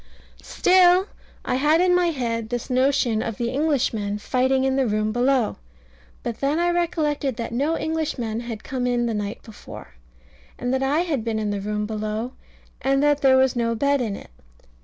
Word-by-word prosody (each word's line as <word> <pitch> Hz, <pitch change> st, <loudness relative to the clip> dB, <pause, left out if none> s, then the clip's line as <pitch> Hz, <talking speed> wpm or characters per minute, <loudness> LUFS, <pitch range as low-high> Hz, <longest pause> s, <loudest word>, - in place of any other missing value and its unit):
Still 365 Hz, 0 st, +4 dB, 0.4 s
I 250 Hz, -, 0 dB
had 300 Hz, +4 st, +3 dB
in 360 Hz, 0 st, +3 dB
my 355 Hz, -1 st, +3 dB
head 230 Hz, -7 st, -2 dB
this 245 Hz, +1 st, -4 dB
notion 255 Hz, -3 st, +2 dB
of 225 Hz, -2 st, -4 dB
the 235 Hz, 0 st, -2 dB
Englishmen 240 Hz, -8 st, 0 dB
fighting 260 Hz, +4 st, +1 dB
in 265 Hz, 0 st, +1 dB
the 270 Hz, -2 st, +1 dB
room 215 Hz, 0 st, 0 dB
below. 245 Hz, 0 st, +1 dB, 0.7 s
But 235 Hz, -1 st, -4 dB
then 280 Hz, +3 st, 0 dB
I 345 Hz, +1 st, +2 dB
recollected 305 Hz, -6 st, -1 dB
that 230 Hz, -1 st, -5 dB
no 285 Hz, +7 st, 0 dB
Englishmen 300 Hz, -10 st, -2 dB
had 235 Hz, -3 st, -6 dB
come 255 Hz, -2 st, -2 dB
in 240 Hz, -1 st, +1 dB
the 230 Hz, -, -1 dB
night 210 Hz, 0 st, -4 dB
before, 220 Hz, -2 st, -11 dB, 0.7 s
and 245 Hz, +1 st, -2 dB
that 265 Hz, -, 0 dB
I 280 Hz, +5 st, +2 dB
had 305 Hz, -10 st, -2 dB
been 225 Hz, -1 st, -2 dB
in 215 Hz, -1 st, -1 dB
the 200 Hz, -1 st, -3 dB
room 210 Hz, +1 st, -2 dB
below, 215 Hz, +2 st, -3 dB, 0.5 s
and 275 Hz, +1 st, +2 dB
that 290 Hz, -1 st, +3 dB
there 265 Hz, -1 st, +5 dB
was 260 Hz, -1 st, +3 dB
no 230 Hz, -1 st, 0 dB
bed 280 Hz, +3 st, +1 dB
in 215 Hz, -5 st, -2 dB
it. -, -, -12 dB
255 Hz, 185 wpm, -23 LUFS, 225-285 Hz, 0.7 s, there